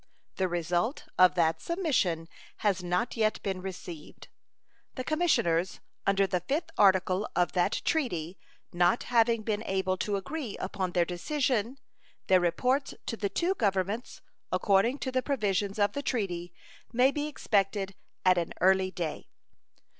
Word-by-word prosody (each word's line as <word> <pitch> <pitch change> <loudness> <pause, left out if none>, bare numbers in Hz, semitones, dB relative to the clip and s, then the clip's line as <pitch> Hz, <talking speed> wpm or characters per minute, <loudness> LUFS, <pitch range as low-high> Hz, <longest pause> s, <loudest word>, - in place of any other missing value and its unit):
The 190 - +1
result 175 - -1 0.2
of 185 0 +7
that 165 -2 +2
submission 255 - 0 0.4
has 190 -3 +2
not 180 +6 -1
yet 220 -2 +1
been 190 -2 -2
received. 180 -4 -8 0.7
The 255 - -3
commissioners 190 - +1 0.3
under 195 0 +4
the 180 -1 -1
5th 295 - -2
article 190 0 +3
of 175 0 +2
that 180 -2 0
treaty 185 - -1 0.3
not 175 +5 +3
having 230 -2 +2
been 210 -1 -1
able 190 -2 0
to 205 +2 -1
agree 255 +3 -4
upon 185 -1 -3
their 175 -1 +3
decision, 245 - -1 0.5
their 185 -1 +5
reports 250 +11 0
to 230 - -3
the 205 -3 -2
two 345 - 0
Governments, 200 - -1 0.3
according 205 +6 +3
to 260 - -3
the 255 0 +1
provisions 205 -7 -1
of 205 -1 +2
the 285 - -2
treaty, 180 -10 -2 0.4
may 250 +3 +4
be 295 +1 -2
expected 195 -7 0 0.3
at 185 -1 +5
an 170 - -3
early 190 +1 +4
day. 175 -4 -5
195 Hz, 145 wpm, -29 LUFS, 180-245 Hz, 0.7 s, of